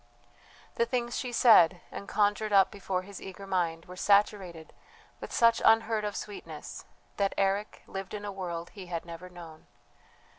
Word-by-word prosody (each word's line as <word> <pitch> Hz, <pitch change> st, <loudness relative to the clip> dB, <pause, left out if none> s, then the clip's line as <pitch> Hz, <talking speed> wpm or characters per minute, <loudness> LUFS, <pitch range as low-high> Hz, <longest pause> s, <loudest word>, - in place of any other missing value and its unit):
The 470 Hz, -1 st, +2 dB
things 240 Hz, -1 st, -2 dB
she 250 Hz, -, -3 dB
said, 190 Hz, -8 st, +6 dB
and 200 Hz, -, -7 dB
conjured 210 Hz, +1 st, +1 dB
up 195 Hz, -1 st, +5 dB
before 195 Hz, -3 st, -3 dB
his 200 Hz, 0 st, -10 dB
eager 195 Hz, +1 st, -9 dB
mind, 170 Hz, -4 st, -1 dB
were 180 Hz, -, -10 dB
saturated 195 Hz, -4 st, +1 dB, 0.5 s
with -, -, -8 dB
such 230 Hz, -1 st, +4 dB
unheard 225 Hz, -1 st, +4 dB
of 205 Hz, -, -3 dB
sweetness 205 Hz, -, -8 dB, 0.3 s
that 200 Hz, -1 st, 0 dB
Eric 200 Hz, +2 st, -1 dB
lived 195 Hz, +1 st, -6 dB
in 205 Hz, 0 st, -6 dB
a 205 Hz, -, -4 dB
world 175 Hz, -3 st, -5 dB
he 195 Hz, -4 st, -10 dB
had 170 Hz, -1 st, -4 dB
never 170 Hz, +2 st, -9 dB
known. 165 Hz, -3 st, -12 dB
195 Hz, 160 wpm, -29 LUFS, 180-210 Hz, 0.5 s, said